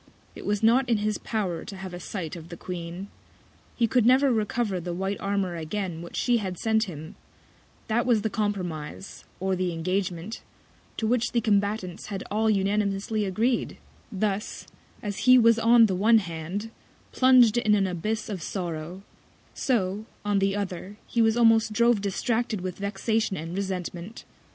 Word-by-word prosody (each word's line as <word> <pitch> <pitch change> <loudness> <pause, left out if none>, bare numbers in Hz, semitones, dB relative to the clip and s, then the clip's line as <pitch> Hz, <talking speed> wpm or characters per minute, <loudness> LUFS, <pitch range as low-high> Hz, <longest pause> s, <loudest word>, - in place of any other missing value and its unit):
It - - -9
was 210 +1 0
not 245 +3 +4
in 230 - +3
his 210 0 -1
Power 190 -7 -2
to 200 - -8
have 190 -1 -7
a 175 - -6
Sight 180 -3 -5
of 165 -1 -10
the 170 - -8
Queen; 175 +2 -6 0.7
he 235 - +2
could 245 +1 +2
never 260 +3 +5
recover 215 -2 0
the 175 0 -4
white 195 +2 -2
Armour 195 -3 -1
again 170 +1 -4
which 170 - -9
She 245 -1 +2
had 190 -5 -4
sent 220 +2 +1
him; 160 -3 -8 0.7
That 235 +3 +1
was 225 -4 +3
the 220 - 0
Compromise, 190 -5 -4
or 190 0 0
the 185 -1 -1
Engagement, 185 +3 -2 0.6
to 220 - -1
which 240 +1 +1
the 240 - +3
Combatants 205 -3 0
had 195 -2 -4
all 220 +1 +2
unanimously 205 +1 0
agreed: 225 +6 0 0.3
Thus, 205 0 -2 0.4
as 205 -2 -3
he 255 0 +9
was 230 -1 +5
on 230 0 +6
the 195 - 0
one 215 +5 +5
Hand, 180 +3 -4 0.4
plung'd 255 -4 +6
in 215 -2 +3
an 200 -1 +2
Abyss 210 +5 -2
of 200 -6 -5
Sorrow; 175 +1 -5 0.5
so 210 -5 0 0.2
on 205 -1 +2
the 195 0 +1
other, 200 0 -5
he 235 - 0
was 225 0 +3
almost 225 -2 +4
drove 235 -1 +3
distracted 225 +1 -1
with 185 0 -5
Vexation 200 +1 -1
and 165 +3 -5
Resentment. 190 +1 -5
205 Hz, 165 wpm, -26 LUFS, 185-225 Hz, 0.7 s, he